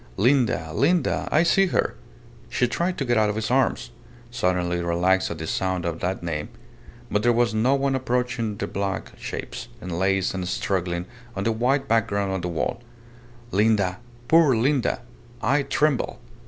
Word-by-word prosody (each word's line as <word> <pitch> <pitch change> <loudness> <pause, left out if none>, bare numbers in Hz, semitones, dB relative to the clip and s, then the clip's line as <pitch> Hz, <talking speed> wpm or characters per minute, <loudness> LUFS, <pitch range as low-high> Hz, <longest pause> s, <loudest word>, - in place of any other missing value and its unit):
Linda, 120 - +2
Linda 165 +8 +1
I 160 - +4
see 195 +3 +4
her!"... - - 0 0.6
She 125 - +1
tried 175 +8 -1
to 135 - -1
get 120 -1 +2
out 105 -1 +3
of 105 - -2
his 110 +2 -2
arms, 125 - +1 0.4
suddenly 90 -6 0
relaxed 90 +2 +2
at 85 - -5
the 80 - -5
sound 95 +1 -1
of 85 -1 -2
that 90 0 -2
name. 75 -3 -3 0.6
But 105 - +2
there 120 +2 +4
was 120 -1 +2
no 120 +5 +3
one 140 0 +1
approaching 125 -4 -1
their - - -3
black 100 0 -3
shapes, - - -6
enlaced 95 0 0
and 95 -2 -3
struggling 90 -2 -1 0.3
on 95 - -2
the 115 - +2
white 130 +5 +1
background 100 -3 +1
of 95 - -2
the 90 - -3
wall. 85 +7 -2 0.7
"Linda! 100 -2 +2 0.3
Poor 160 -5 +5
Linda! 125 0 +1 0.4
I 140 +2 +2
tremble! 145 -1 0
110 Hz, 165 wpm, -24 LUFS, 90-125 Hz, 0.7 s, Poor